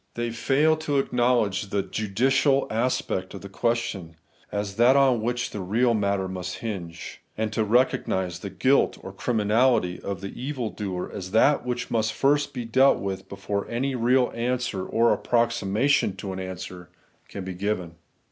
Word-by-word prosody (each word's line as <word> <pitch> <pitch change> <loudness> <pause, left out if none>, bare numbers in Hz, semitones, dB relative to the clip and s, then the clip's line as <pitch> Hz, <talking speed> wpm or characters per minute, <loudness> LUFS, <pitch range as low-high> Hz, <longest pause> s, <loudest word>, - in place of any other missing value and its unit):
They 120 0 -2
fail 145 +7 +2
to 150 -2 -1
acknowledge 120 -7 +1
the 100 -1 0
judicial 130 +8 +1
aspect 120 +3 -1
of - - -8
the 100 - -9
question, 95 -6 -2 0.4
as 100 -1 -3
that 120 +3 +6
on 135 -4 +4
which 120 +2 -2
the 105 - -5
real 110 +7 +2
answer 100 -3 0
must 90 -1 -5
hinge; 85 -7 -6 0.2
and 110 0 -2
to 110 - +1
recognise 100 -6 +1
the 100 - -6
guilt 130 +8 +2
or 95 - -8
criminality 110 -3 +1
of 100 -2 -5
the 100 - -5
evil 130 -3 -4
doer 95 -4 -4
as 95 -2 -6
that 125 +3 +4
which 125 0 -3
must 110 -1 +1
first 145 +1 +2
be 125 -3 -5
dealt 130 +4 +4
with 95 -1 -5
before 100 +1 -4
any 130 +4 -1
real 125 +1 +2
answer, 120 -4 -2
or 115 +1 +3
approxima 115 -1 +1
tion 140 -8 +2
to 95 -2 -5
an 95 - -5
answer, 90 -2 -7 0.4
can 100 - -6
be 95 - -4
given. 90 -2 -2
110 Hz, 165 wpm, -25 LUFS, 95-125 Hz, 0.4 s, that